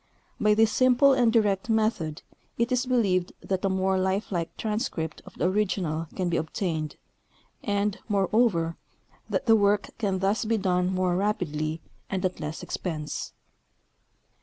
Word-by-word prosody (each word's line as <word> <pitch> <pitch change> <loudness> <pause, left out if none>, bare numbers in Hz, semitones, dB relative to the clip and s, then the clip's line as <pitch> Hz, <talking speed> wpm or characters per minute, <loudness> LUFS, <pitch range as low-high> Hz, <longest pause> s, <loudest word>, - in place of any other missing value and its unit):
By 210 0 +4
this 220 0 +4
simple 255 +3 +5
and 245 -3 +3
direct 210 -2 +2
method 215 -9 0 0.3
it 235 +2 0
is 250 +1 +1
believed 195 -8 +1
that 190 0 -2
a 195 - +2
iiiore 190 0 +1
lifelike 190 -3 -2
transcript 210 - -3
of - - -12
the 175 - +1
original 180 -5 0
can 185 -2 -1
be 170 -1 +1
obtained, 160 -1 -2 0.7
and, 205 -1 0
moreover, 195 -4 +2 0.5
that - - -1
the 225 - +6
work 205 -1 +2
can 200 -4 0
thus 195 +5 +1
be 225 0 +1
done 180 -2 +1
more 185 -1 +1
rapidly 160 -6 -1 0.3
and 190 -1 -1
at 185 - -2
less 150 +2 -5
expense. 155 -5 -4
195 Hz, 145 wpm, -27 LUFS, 175-215 Hz, 0.7 s, the